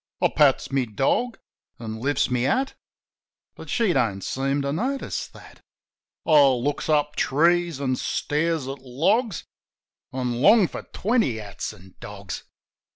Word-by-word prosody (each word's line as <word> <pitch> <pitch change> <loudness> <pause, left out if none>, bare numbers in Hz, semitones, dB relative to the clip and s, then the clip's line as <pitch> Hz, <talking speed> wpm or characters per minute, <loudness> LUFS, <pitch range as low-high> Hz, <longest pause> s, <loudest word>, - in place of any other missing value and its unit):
I - - +3
pats 145 -3 +3
my 135 -2 +1
dog, 135 - 0 0.4
an' 110 -1 -7
Hfts 140 0 0
my 125 - +1
hat; 255 - +1 0.8
But - - -12
she 225 -7 +2
don't 110 -8 0
seem 135 +1 -1
to 140 0 -1
notice 260 - -2
that. - - -16 0.6
I 155 -3 +6
looks 135 +4 -1
up 150 -1 +2
trees 170 +1 +2
an' 130 -2 0
stares 155 -1 -1
at 135 +1 -5
logs. 175 - 0 0.7
An' 125 -2 -2
long 205 - +6
for - - -7
twenty 215 - +1
hats 100 -3 -6
an' 95 +1 -16
dogs. 100 -2 -8
140 Hz, 140 wpm, -24 LUFS, 125-170 Hz, 0.8 s, I